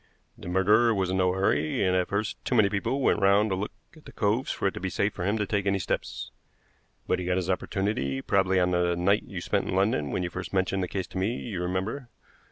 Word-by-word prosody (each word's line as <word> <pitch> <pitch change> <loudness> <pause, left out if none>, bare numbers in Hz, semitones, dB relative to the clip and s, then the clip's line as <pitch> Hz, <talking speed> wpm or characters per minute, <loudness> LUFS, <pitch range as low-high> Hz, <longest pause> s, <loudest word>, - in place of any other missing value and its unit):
The - - -11
murderer 105 +6 +4
was 95 -2 0
in 95 - 0
no 90 -1 +2
hurry, 95 -4 +1
and 90 -1 +2
at 90 -1 +1
first 100 +2 -3
too 125 - -1
many 105 -4 +5
people 105 +7 -1
went 130 - +3
round 100 +2 +4
to - - +1
look 100 +3 -3 0.2
at 155 - -18
the - - -11
coves 110 +5 0
for - - -1
it 95 - -1
to - - -6
be 95 - -2
safe 100 +3 0
for - - -5
him 100 +3 +1
to 105 - 0
take 100 -1 -1
any 100 0 +2
steps. 90 - -3 0.7
But 90 - 0
he 90 - -4
got 90 0 +1
his 95 0 0
opportunity 95 -8 -1
probably 95 +2 +2
on 90 0 +2
the 90 -1 +1
night 100 +4 +2
you 95 -3 -6
spent - - -1
in - - -1
London 95 -7 +1
when 90 - -1
you 85 - -3
first 90 +2 -6
mentioned 95 0 +1
the 90 - -1
case 95 +1 -3
to 95 - -4
me, 105 +6 0
you 105 -9 -5
remember. 95 +9 -3
95 Hz, 255 wpm, -27 LUFS, 90-105 Hz, 0.7 s, many